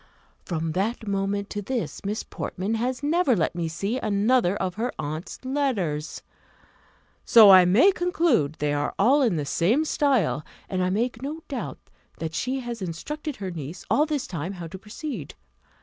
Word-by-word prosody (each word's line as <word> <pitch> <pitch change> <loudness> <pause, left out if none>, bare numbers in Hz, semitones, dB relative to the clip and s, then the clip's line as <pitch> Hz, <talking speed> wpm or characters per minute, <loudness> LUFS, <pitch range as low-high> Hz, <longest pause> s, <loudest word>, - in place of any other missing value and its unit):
From 165 -2 -2
that 215 +6 -2
moment 200 0 -1
to 205 - -3
this, 240 +3 -3
Miss 205 +2 -2
Portman 195 +5 -4
has 250 +4 -2
never 300 -3 +3
let 165 -5 0
me 170 -1 -2
see 195 +10 -2
another 210 -1 +2
of 185 -3 -2
her 230 +6 -2
aunt's 155 +4 -5
letters. 215 - -1 1.0
So 220 -4 +8
I 185 -1 +9
may 225 - +6
conclude 335 - +1
they 145 -1 -1
are 145 0 -1
all 265 +9 +4
in 230 -9 +2
the 150 -2 -2
same 220 - +2
style; 275 - +1 0.2
and 185 -1 -1
I 180 - +1
make 230 +4 -1
no 305 +4 -5
doubt 270 -4 -4 0.4
that 160 -1 -4
she 255 +10 -2
has 240 -3 -6
instructed 290 - -5
her 195 -5 -5
niece, 160 +1 -7
all 300 +2 +4
this 295 -4 -1
time, 175 +2 -4
how 175 -3 -7
to 190 - -8
proceed. 210 - -7
205 Hz, 170 wpm, -25 LUFS, 175-260 Hz, 1.0 s, I